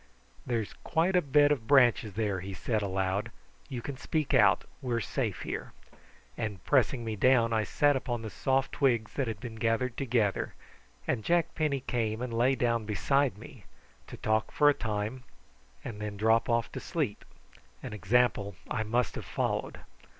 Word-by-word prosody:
"There's 115 -4 -1
quite 175 +4 +1
a 180 - +5
bed 145 0 +4
of 120 -7 -1
branches 120 -6 +4
there," 105 -3 0
he 95 +1 -6
said 110 +5 -1
aloud. 95 +2 -1 0.4
"You 125 -4 -5
can 140 0 -5
speak 155 +2 -1
out, - - +5 0.2
we 125 -2 -1
are - - +1
safe 115 -4 -2
here;" - - -5 0.6
and 105 -6 -4
pressing 130 -3 +2
me 110 -1 -2
down 115 +1 +4
I 110 -1 +2
sat 145 +5 +2
upon 120 -3 -3
the 110 - -6
soft 135 0 0
twigs 120 -6 +1
that 135 -3 -1
had 110 - -4
been 115 -3 -7
gathered 115 +2 0
together, 115 -7 0 0.5
and 110 - 0
Jack 170 +4 +1
Penny 145 -4 0
came 115 -4 -1
and 125 -1 -4
lay 125 +4 +3
down 115 -2 +1
beside 130 +3 +1
me, - - -13 0.4
to - - -9
talk 110 0 0
for 145 - +4
a - - +5
time 110 +1 -3 0.6
and 105 -2 -6
then 105 -1 -4
drop 110 +3 +3
off 115 -1 +1
to - - -5
sleep, - - -3 0.6
an - - -6
example 105 -1 +1 0.2
I - - 0
must 115 +3 0
have - - -6
followed. - - -2
115 Hz, 175 wpm, -30 LUFS, 110-130 Hz, 0.6 s, a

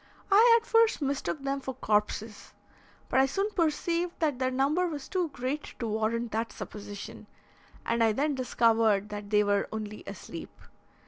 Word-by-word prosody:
I 460 +4 +7
at 455 - -21
first 455 -1 +4
mistook 280 0 -2
them 275 0 -1
for 265 -1 -5
corpses, 210 -2 -1 0.5
but - - +2
I 265 - +5
soon 395 +9 -1
perceived 340 0 0
that 295 -6 0
their 255 -1 +1
number 280 +8 +1
was 295 -5 -5
too 360 -3 -1
great 270 +3 -4
to 235 - -3
warrant 220 +1 -1
that 225 +2 -2
supposition, 205 -1 -8 0.6
and 230 0 +1
I 225 - +4
then 285 +7 0
discovered 225 -5 +2
that 205 -1 -6
they 210 0 +4
were 205 -1 +1
only 215 -1 -6
asleep. - - -9
255 Hz, 165 wpm, -29 LUFS, 220-310 Hz, 0.6 s, I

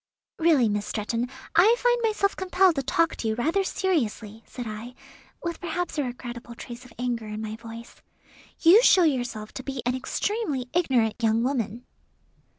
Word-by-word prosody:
"Really, 315 -8 +4
Miss 205 0 -1
Stretton, 230 +3 -2 0.3
I 405 +8 +6
find 485 -1 +2
myself 425 -3 +1
compelled 370 -1 +3
to - - +2
talk 325 +5 +1
to 225 - -3
you 220 - 0
rather 325 - +1
seriously," 230 - -1
said 245 - -7
I, 220 +4 -7 0.5
with 340 0 -3
perhaps 355 +1 -3
a - - +2
regrettable 240 -1 -7
trace 240 +2 -9
of 250 -2 -15
anger 240 -2 -2
in 210 0 -5
my 215 0 -4
voice. 230 +1 -10 0.6
"You 360 +7 +8
show 375 -6 +6
yourself 245 -8 -1
to 260 - -6
be 270 -2 -5
an 245 - +1
extremely 285 - -2
ignorant 250 -10 +1
young 225 0 +2
woman." 245 -2 -2
250 Hz, 165 wpm, -26 LUFS, 230-340 Hz, 0.6 s, You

